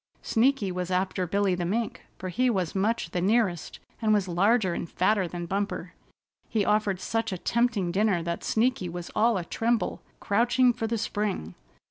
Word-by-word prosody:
Sneaky 230 -4 +2
was 180 0 -3
after 185 0 0
Billy 200 +1 +1
the 180 0 -2
Mink, 220 +6 -2 0.2
for 185 - -5
he 250 +8 +1
was 185 -7 -1
much 200 -2 0
the 175 - -1
nearest, 195 -4 +1 0.2
and 220 -1 +2
was 205 -3 +2
larger 190 +2 +2
and 170 - -4
fatter 190 0 +1
than 175 0 -5
Bumper. 200 +3 -3 0.6
He 215 -3 +1
offered 210 -3 +1
such 225 +2 -2
a 185 - -2
tempting 225 -3 +1
dinner 195 -2 +1
that 170 0 -3
Sneaky 225 -5 +1
was 175 0 -6
all 225 0 +3
atremble, 225 +6 -1 0.2
crouching 240 +4 +3
for 225 - -3
the 230 +1 -1
spring. 205 - -2
200 Hz, 170 wpm, -27 LUFS, 180-225 Hz, 0.6 s, all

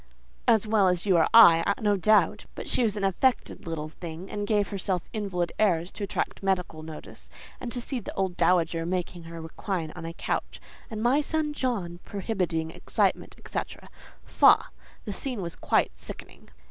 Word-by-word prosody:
"As 225 -3 +4
well 210 -3 +3
as 180 0 +1
you 190 -4 +4
or 160 - +4
I, 170 -8 +7
no 205 -1 +2
doubt; 215 +2 +3
but - - -7
she - - +1
is 215 -3 +1
an 200 - -3
affected 195 +1 0
little 155 -2 -3
thing, 165 +3 -8
and 205 -1 -3
gave 205 -2 +1
herself 190 -3 -2
invalid 185 -5 -2
airs 180 -5 +2
to 210 - -7
attract - - -3
medical 180 -5 -1
notice. 155 -1 -10 0.3
And 240 - -5
to 245 - -3
see 250 +1 -3
the 220 - -8
old 190 -2 -1
dowager 170 -1 +2
making 175 -1 -3
her 165 0 -8
recline 165 0 -4
on 165 -2 -6
a 165 - -6
couch, - - -3 0.3
and 220 -1 -4
'my 260 +5 +4
son 305 0 -1
John' 200 -12 -2
prohibiting 180 -6 -2
excitement, - - -1
etcetera—faugh! - - 0 0.3
the 205 - -4
scene 250 +1 -4
was 170 -3 -5
quite - - +1
sickening." - - -10
190 Hz, 170 wpm, -27 LUFS, 170-215 Hz, 0.3 s, I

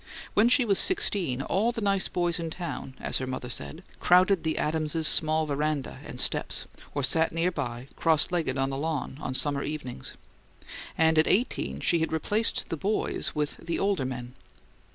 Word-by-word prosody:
When 220 +3 +4
she 255 0 +4
was 200 -3 +3
sixteen 175 - +2
"all 215 +10 +1
the 230 - -5
nice 200 -2 +1
boys 175 -1 -1
in 165 -1 -3
town," 160 -5 -6
as - - 0
her 130 - -4
mother 130 -1 -5
said, 70 -8 -6 0.2
crowded 185 +1 +4
the 160 -1 -1
Adamses' 155 +1 0
small 155 0 +4
veranda 150 -1 -2
and - - -9
steps, - - +1 0.3
or 145 - -1
sat 160 +4 +2
near 165 +2 0
by, 120 -6 -5
cross 160 -1 +3
legged 160 -7 -1
on 135 0 0
the 135 - -3
lawn, 150 -3 -3
on 130 - -3
summer 140 +2 +2
evenings; 145 -5 -5 0.8
and 160 -1 +4
at 155 - +4
eighteen 235 +6 0
she 170 - +3
had 160 - -1
replaced 205 +8 +1
the 165 - -3
boys 205 +7 -1
with 150 -1 -2
"the 170 - -4
older 195 -7 0
men." 125 -1 -6
160 Hz, 180 wpm, -27 LUFS, 140-180 Hz, 0.8 s, When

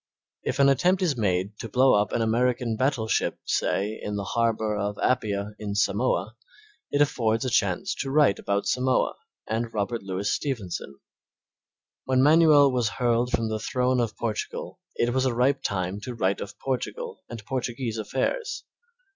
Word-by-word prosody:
If 130 - -2
an 140 -1 +5
attempt 180 +8 +3
is 160 -6 +1
made 100 -2 -1
to 115 - -6
blow 130 +4 +4
up 105 0 +2
an 115 - 0
American 120 +1 +1
battleship, 120 -2 0
say, 105 +3 0
in 105 - -4
the 100 - -2
harbor 110 0 0
of 105 0 -2
Appia, 105 -4 0
in 100 -1 -4
Samoa, - - 0 0.5
it 145 +1 +4
affords 115 -4 0
a 130 - -1
chance 100 -6 +1
to 135 - -2
write 140 -7 +3
about 100 0 -1
Samoa 130 0 +1 0.3
and 115 +1 -2
Robert 110 +2 -2
Louis 95 +1 -3
Stephenson. 100 - -3 1.1
When 130 0 +3
Manuel 150 -2 +6
was 120 -4 +1
hurled 120 0 +2
from 115 -3 0
the 110 0 -2
throne 125 +3 0
of 115 -3 -1
Portugal 110 -3 -4 0.2
it 120 0 +1
was 130 0 +2
a 120 - -1
ripe 135 +3 +2
time 95 +1 -2
to 125 +3 -6
write 100 -3 0
of 100 - -7
Portugal 460 - -4
and 115 -4 -8
Portuguese 120 -2 -3
affairs. 460 - -2
115 Hz, 165 wpm, -26 LUFS, 105-130 Hz, 1.1 s, Manuel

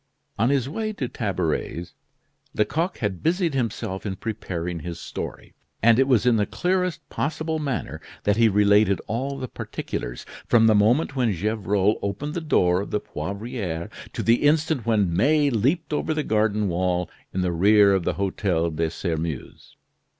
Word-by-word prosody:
On 115 +4 +3
his 135 -3 +1
way 215 +8 -3
to 135 -10 -3
Tabaret's, 90 -5 -2 0.6
Lecoq 160 - 0
had 100 -6 -3
busied 170 -1 +1
himself 110 -7 -2
in 95 -3 -3
preparing 90 -5 -4
his 85 +1 -6
story; 90 - -7 0.3
and 115 +1 +6
it 135 - +4
was 125 -4 +3
in 120 -2 +4
the 105 - +1
clearest 180 -2 -1
possible 160 +2 -2
manner 125 - -3 0.2
that 105 - +2
he 115 0 +5
related 105 -1 +4
all 135 +5 -3
the 130 -1 -4
particulars, - - -5 0.2
from 115 -1 +5
the 110 - +6
moment 120 +8 +3
when 125 -4 +2
Gevrol 105 +1 +1
opened 105 +10 -3
the 170 - -3
door 90 - +2
of 100 - -6
the 105 - 0
Poivriere 100 -6 -5 0.2
to - - -3
the 115 +1 +3
instant 150 -4 +2
when 100 -7 +2
May 145 - +3
leaped 140 - 0
over 155 +1 -1
the 155 - 0
garden 105 -2 +1
wall 90 0 0 0.2
in 95 - -1
the 90 -1 0
rear 100 +3 +5
of 95 -2 +1
the - - 0
Hotel 95 -4 0
de 80 +1 -1
Sairmeuse. 80 -4 -5
105 Hz, 165 wpm, -24 LUFS, 95-135 Hz, 0.6 s, and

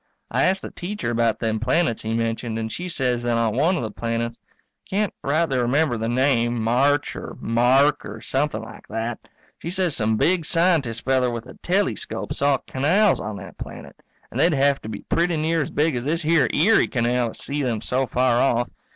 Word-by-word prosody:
I - - +2
asked 190 +1 +1
the - - -6
Teacher 190 - -4
about 115 -1 +1
them 110 -1 -1
planets 125 +1 +1
he 110 +1 -2
mentioned 115 0 -2
and 110 0 -3
she 180 +10 -5
says 125 -7 0
that 120 -1 0
on 115 -2 +1
one 160 +8 +3
of 165 - -2
the 110 - -4
planets 115 +1 -3 0.5
can't 205 +1 0
rightly 145 -2 +1
remember 125 +3 +2
the 115 0 -2
name, 120 -2 +2
March 135 +6 +1
or - - -7
Mark 125 +5 +3
or 105 +2 -8
something 135 -2 -1
like - - -12
that 115 +1 -3 0.4
she 170 - -5
says 180 -4 0
some 110 -1 +1
big 170 - +2
scientist 160 -9 +1
feller 130 -1 +2
with 120 -1 -5
a 125 - -11
telescope 195 +3 -1
saw 140 -1 +2
canals 180 +10 +2
on 105 0 -5
that 100 - -10
planet, - - -9 0.4
and 120 - -4
they'd 165 +2 +4
hev 140 0 +2
to 110 - -7
be 105 - -6
pretty 170 -1 +1
near 160 +1 +1
as 140 - -3
big 150 -1 +1
as 120 - -2
this 165 +3 -1
here 155 -4 +3
Erie 210 +9 +4
canal 120 -1 0
to - - -8
see 145 +1 -2
them 120 -5 -1
so 130 +4 -1
far 125 0 +2
off. 120 -2 +1
130 Hz, 205 wpm, -23 LUFS, 115-160 Hz, 0.5 s, they'd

